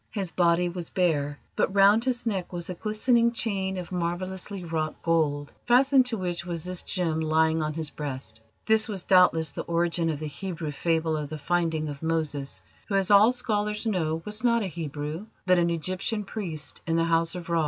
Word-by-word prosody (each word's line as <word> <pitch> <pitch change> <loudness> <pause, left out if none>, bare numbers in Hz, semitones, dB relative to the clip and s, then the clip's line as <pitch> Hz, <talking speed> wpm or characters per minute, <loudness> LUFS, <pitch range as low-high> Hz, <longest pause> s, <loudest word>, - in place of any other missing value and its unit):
His 195 -5 -3
body 175 0 +3
was 175 -1 -5
bare, 145 -6 0 0.2
but 190 - 0
round 200 +4 +5
his 245 -2 -1
neck 195 -6 -2
was 175 0 -4
a - - -3
glistening 230 +5 +2
chain 195 -5 -1
of 180 0 -6
marvellously 185 +2 -3
wrought 160 -2 -3
gold, 150 -3 0
fastened 260 +1 +5
to 235 -3 -2
which 175 -3 -3
was 170 -2 -4
this 180 0 -2
gem 165 -4 -1
lying 160 0 +2
on 155 0 -2
his 160 -2 -3
breast. 130 -6 -6 0.2
This 220 +1 +4
was 195 -4 -3
doubtless 170 -5 +4
the - - -5
origin 170 0 0
of 155 - -1
the 155 - -5
Hebrew 160 +1 -5
fable 160 +1 0
of 150 -2 -4
the 155 - -5
finding 160 0 0
of 145 -1 -7
Moses, 150 -10 -2 0.2
who, 200 - -1
as 195 0 +2
all 205 +4 +7
scholars 210 -3 -1
know, 165 -6 -1
was 210 +2 -2
not 235 -2 +3
a - - -2
Hebrew, 155 +2 -5 0.2
but 185 -1 +4
an 170 0 +2
Egyptian 185 +6 -2
priest 170 -8 -5
in 165 - +1
the 165 - +3
House 165 +1 +1
of 175 -2 -7
Ra. 170 - +3
175 Hz, 195 wpm, -27 LUFS, 160-200 Hz, 0.2 s, all